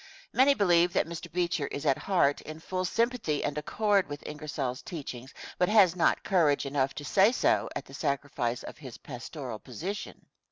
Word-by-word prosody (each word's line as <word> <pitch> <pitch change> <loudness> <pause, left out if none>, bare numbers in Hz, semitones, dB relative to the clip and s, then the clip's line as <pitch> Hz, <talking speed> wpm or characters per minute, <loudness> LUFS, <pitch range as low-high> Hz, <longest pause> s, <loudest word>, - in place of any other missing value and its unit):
Many 270 +3 +5
believe 175 -4 +4
that - - +2
Mr. 170 0 -7
Beecher 170 -4 0
is 145 +2 -5
at 135 -3 +3
heart 170 -8 +2
in 155 +1 -8
full 185 +3 -3
sympathy 230 - 0
and 145 - -1
accord 200 +4 +1
with 145 0 -7
Ingersoll's 145 -4 -4
teachings, 135 -5 -7 0.3
but 180 - +3
has 200 -5 +6
not 175 - +2
courage 160 -8 +2
enough 135 -1 0
to 145 - -6
say 195 +8 +5
so - - +2
at - - -4
the - - -14
sacrifice 140 -4 -2
of - - -9
his 130 -6 -9
pastoral 125 -2 -7
position. 180 - -6
155 Hz, 175 wpm, -29 LUFS, 140-185 Hz, 0.3 s, has